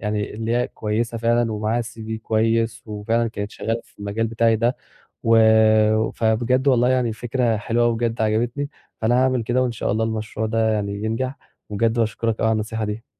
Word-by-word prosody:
يعني 105 Hz, -1 st, -2 dB
اللي 115 Hz, +1 st, -4 dB
هي 125 Hz, +1 st, 0 dB
كويسة 115 Hz, +2 st, -2 dB
فعلًا 115 Hz, 0 st, +1 dB
ومعاها 110 Hz, +3 st, -1 dB
CV 110 Hz, -1 st, -8 dB
كويس، 115 Hz, +1 st, 0 dB
وفعلًا 115 Hz, +2 st, -1 dB
كانت 105 Hz, -2 st, -5 dB
شغّالة 115 Hz, +1 st, -3 dB
في -, -, -27 dB
المجال 105 Hz, +3 st, -2 dB
بتاعي 115 Hz, 0 st, +2 dB
ده، 120 Hz, +3 st, +1 dB, 0.5 s
و 115 Hz, 0 st, +4 dB, 0.7 s
فبجد 120 Hz, +4 st, +1 dB
والله 125 Hz, -2 st, +4 dB
يعني 125 Hz, -2 st, +2 dB
الفكرة 115 Hz, 0 st, -1 dB
حلوة 115 Hz, +3 st, 0 dB
أوي 120 Hz, -1 st, +2 dB
بجد 115 Hz, -1 st, -1 dB
عجبتني، 120 Hz, +6 st, 0 dB, 0.3 s
فأنا 115 Hz, +2 st, +2 dB
هاعمل 130 Hz, -3 st, +1 dB
كده 120 Hz, +3 st, +1 dB
وإن 125 Hz, -, 0 dB
شاء 115 Hz, -, -2 dB
الله 110 Hz, +2 st, 0 dB
المشروع 110 Hz, 0 st, -3 dB
ده 110 Hz, 0 st, +1 dB
يعني 100 Hz, 0 st, -3 dB
ينجح، 130 Hz, +5 st, -2 dB, 0.3 s
وبجد 110 Hz, +2 st, +1 dB
باشكرك 115 Hz, 0 st, -1 dB
أوي 110 Hz, -, +2 dB
على -, -, +3 dB
النصيحة 110 Hz, 0 st, -2 dB
دي. 105 Hz, +3 st, -5 dB
115 Hz, 180 wpm, -22 LUFS, 110-120 Hz, 0.7 s, و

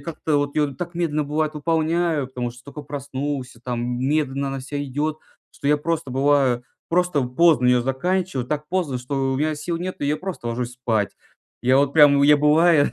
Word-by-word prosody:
как-то 160 Hz, -2 st, -2 dB
вот 145 Hz, 0 st, -2 dB
ее 145 Hz, -2 st, +1 dB
так 175 Hz, +5 st, -6 dB
медленно, 155 Hz, -3 st, 0 dB
бывает, 155 Hz, +1 st, -1 dB
выполняю, 160 Hz, -1 st, 0 dB
потому 125 Hz, -2 st, -4 dB
что 120 Hz, +1 st, -15 dB
только 145 Hz, +1 st, -9 dB
проснулся 140 Hz, -2 st, -5 dB
там, 120 Hz, 0 st, -3 dB
медленно 140 Hz, 0 st, 0 dB
она 135 Hz, 0 st, -4 dB
вся 145 Hz, +2 st, -4 dB
идет, 145 Hz, +3 st, -2 dB, 0.4 s
что -, -, -7 dB
я 150 Hz, +1 st, +4 dB
просто 160 Hz, -1 st, -2 dB
бываю, 135 Hz, -3 st, +2 dB, 0.3 s
просто 175 Hz, -4 st, +1 dB
поздно 125 Hz, +1 st, +3 dB
ее 125 Hz, -1 st, +4 dB
заканчиваю, 135 Hz, +1 st, -1 dB
так 150 Hz, +2 st, -3 dB
поздно, 170 Hz, -9 st, -1 dB
что 135 Hz, +1 st, -2 dB
у 130 Hz, -, -1 dB
меня 155 Hz, +2 st, 0 dB
сил 165 Hz, +3 st, -3 dB
нет, 185 Hz, +2 st, -4 dB
и 145 Hz, -, -1 dB
я 150 Hz, +1 st, +1 dB
просто 185 Hz, -7 st, -6 dB
ложусь 120 Hz, +1 st, -3 dB
спать. 115 Hz, -5 st, -1 dB, 0.5 s
Я 130 Hz, +2 st, +4 dB
вот 140 Hz, 0 st, +2 dB
прям, 145 Hz, -2 st, +6 dB
я, 150 Hz, +1 st, +6 dB
бывает, 150 Hz, -1 st, +4 dB
145 Hz, 190 wpm, -22 LUFS, 130-155 Hz, 0.5 s, прям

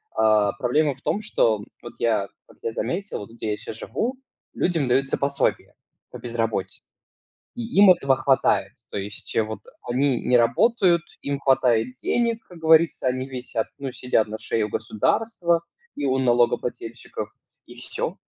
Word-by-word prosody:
А 110 Hz, -2 st, +3 dB
проблема 145 Hz, +2 st, +1 dB
в 130 Hz, -, -24 dB
том, 205 Hz, -, -1 dB
что 110 Hz, -, +1 dB, 0.2 s
вот 120 Hz, -, -9 dB
я 110 Hz, -4 st, +1 dB, 0.2 s
как -, -, -20 dB
я 115 Hz, -, -1 dB
заметил, 170 Hz, -, -3 dB
где 115 Hz, -1 st, -5 dB
я -, -, -4 dB
щас 110 Hz, 0 st, -8 dB
живу, 230 Hz, -, -3 dB, 0.4 s
людям 165 Hz, -6 st, 0 dB
даются 135 Hz, +2 st, +1 dB
пособия 140 Hz, 0 st, -1 dB, 0.4 s
по -, -, -7 dB
безработице. 115 Hz, -4 st, -3 dB, 0.7 s
И 240 Hz, -, -4 dB, 0.2 s
им 205 Hz, -2 st, +9 dB
этого 135 Hz, -7 st, +4 dB
хватает. 135 Hz, -1 st, +2 dB, 0.2 s
То -, -, -3 dB
есть 100 Hz, +1 st, -7 dB
вот 110 Hz, 0 st, -3 dB, 0.2 s
они 130 Hz, 0 st, +1 dB
не 125 Hz, -, +3 dB
работают, 170 Hz, -, +3 dB, 0.2 s
им 140 Hz, 0 st, -2 dB
хватает 125 Hz, -3 st, +3 dB
денег, 230 Hz, -, 0 dB
как 180 Hz, -, -12 dB
говорится, 160 Hz, -3 st, +4 dB
они 130 Hz, +1 st, -2 dB
висят, 125 Hz, -4 st, -3 dB
ну, 135 Hz, -1 st, -4 dB
сидят 125 Hz, -3 st, +1 dB
на 110 Hz, +1 st, -5 dB
шее 110 Hz, -1 st, -1 dB
у -, -, -9 dB
государства 170 Hz, -, 0 dB, 0.3 s
и -, -, -3 dB
у 130 Hz, 0 st, +2 dB
налогоплательщиков, 120 Hz, -2 st, 0 dB, 0.4 s
и -, -, -12 dB
всё. -, -, -4 dB
125 Hz, 155 wpm, -24 LUFS, 115-155 Hz, 0.7 s, им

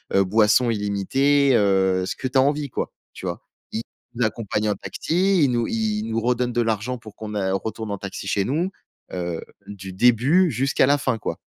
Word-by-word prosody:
heu, 95 Hz, -, +5 dB
boissons 110 Hz, +4 st, +4 dB
illimitées, 130 Hz, +8 st, +2 dB
heu, 95 Hz, -3 st, +2 dB
ce -, -, -3 dB
que -, -, -3 dB
tu 130 Hz, +1 st, 0 dB
as -, -, +7 dB
envie 145 Hz, +1 st, +1 dB
quoi, -, -, -3 dB, 0.2 s
tu -, -, -9 dB
vois? -, -, -4 dB, 0.7 s
Il 120 Hz, -, 0 dB
accompagne 110 Hz, -1 st, -2 dB
en -, -, +2 dB
taxi, 185 Hz, +1 st, +1 dB
il 135 Hz, -, +3 dB
nous 120 Hz, -1 st, 0 dB
il 110 Hz, -1 st, -1 dB
nous 115 Hz, 0 st, 0 dB
redonne 125 Hz, +1 st, 0 dB
de 120 Hz, -, +2 dB
l'argent 115 Hz, +3 st, -1 dB
pour 110 Hz, -3 st, -13 dB
qu'on 105 Hz, -1 st, -7 dB
a 95 Hz, -2 st, 0 dB
retourne 110 Hz, +2 st, -4 dB
en 100 Hz, -, -4 dB
taxi 100 Hz, 0 st, -6 dB
chez 100 Hz, 0 st, +1 dB
nous, 165 Hz, +9 st, -1 dB, 0.4 s
heu, 85 Hz, -2 st, -3 dB, 0.3 s
du 95 Hz, -2 st, -8 dB
début 125 Hz, -, +4 dB
jusqu'à 130 Hz, +2 st, +2 dB
la 145 Hz, +1 st, +4 dB
fin, 130 Hz, -4 st, -1 dB
quoi. -, -, -4 dB
115 Hz, 200 wpm, -23 LUFS, 100-130 Hz, 0.7 s, as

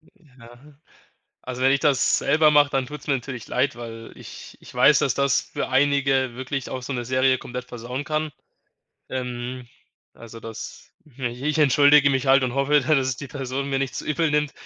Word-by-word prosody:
Ja, 125 Hz, -, -18 dB, 0.8 s
also, 130 Hz, 0 st, -6 dB
wenn 135 Hz, +1 st, +4 dB
ich 140 Hz, -, +2 dB
das 140 Hz, -4 st, +2 dB
selber 155 Hz, 0 st, +3 dB
mache, 145 Hz, -1 st, +5 dB
dann 135 Hz, -2 st, -1 dB
tut's 150 Hz, +2 st, -10 dB
mir 140 Hz, -, +2 dB
natürlich 125 Hz, -3 st, -7 dB
leid, 130 Hz, +3 st, 0 dB
weil 115 Hz, -1 st, -9 dB
ich -, -, -12 dB
ich -, -, -14 dB
weiß, -, -, +5 dB
dass -, -, +1 dB
das 140 Hz, -1 st, +2 dB
für -, -, -5 dB
einige 135 Hz, -2 st, +2 dB
wirklich 130 Hz, +1 st, -4 dB
auch 130 Hz, -, -5 dB
so 140 Hz, -, -5 dB
'ne 120 Hz, -1 st, -4 dB
Serie 130 Hz, +1 st, +2 dB
komplett 125 Hz, +1 st, -7 dB
versauen 125 Hz, +3 st, -6 dB
kann. 155 Hz, 0 st, -2 dB, 0.8 s
Ähm, 125 Hz, -1 st, -5 dB, 0.5 s
also, 115 Hz, 0 st, -12 dB
das 115 Hz, -1 st, -9 dB, 0.3 s
i 130 Hz, -, -6 dB, 0.2 s
ich 155 Hz, -, -1 dB
entschuldige 145 Hz, 0 st, +5 dB
mich 130 Hz, 0 st, -1 dB
halt 135 Hz, 0 st, +5 dB
und 125 Hz, 0 st, -2 dB
hoffe, 145 Hz, +2 st, +3 dB
dass 140 Hz, +4 st, -4 dB, 0.2 s
es 130 Hz, -, -2 dB
die 140 Hz, -, -8 dB
Person 135 Hz, +1 st, -4 dB
mir 135 Hz, -, 0 dB
nicht 135 Hz, -1 st, -3 dB
zu -, -, -5 dB
übel 155 Hz, +1 st, 0 dB
nimmt 150 Hz, -1 st, 0 dB
135 Hz, 190 wpm, -23 LUFS, 125-145 Hz, 0.8 s, mache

